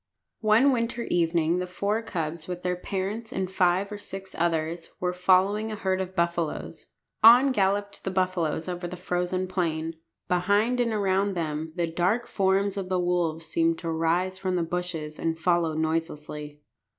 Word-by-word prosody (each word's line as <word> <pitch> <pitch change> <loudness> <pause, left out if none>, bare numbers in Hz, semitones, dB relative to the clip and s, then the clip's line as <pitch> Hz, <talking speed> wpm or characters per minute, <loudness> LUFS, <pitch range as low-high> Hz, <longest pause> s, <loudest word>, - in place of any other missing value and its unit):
One 225 +6 +5
winter 235 -1 -1
evening 170 -1 +1
the 180 - -3
four 200 +4 -1
cubs, 165 -6 -4
with 180 -1 -5
their 180 0 0
parents 200 +5 -4
and 190 -1 -2
five 185 +2 +2
or 205 - -5
six 195 -1 -7
others, 165 0 -1
were 180 0 -1
following 190 +4 +3
a - - -3
herd 190 -2 0
of 185 0 -6
buffaloes. 170 -2 -2 0.4
On 245 +5 +8
galloped 200 -2 0
the - - -2
buffaloes 185 -4 0
over 175 -1 -4
the 180 - -6
frozen 180 +1 -1
plain. 165 -3 -2 0.3
Behind 205 +7 +2
and 240 -1 +2
around 200 -1 +1
them 160 -1 -3
the 175 -2 +1
dark 180 +8 0
forms 195 0 +1
of 190 -2 -3
the 185 -1 +1
wolves 175 -2 0
seemed 165 +1 +1
to 165 -2 -4
rise 175 +4 0
from 185 -1 -1
the 175 - +1
bushes 165 -3 -4
and 165 0 -1
follow 170 -2 +1
noiselessly. 150 -2 -3
180 Hz, 165 wpm, -26 LUFS, 165-195 Hz, 0.4 s, On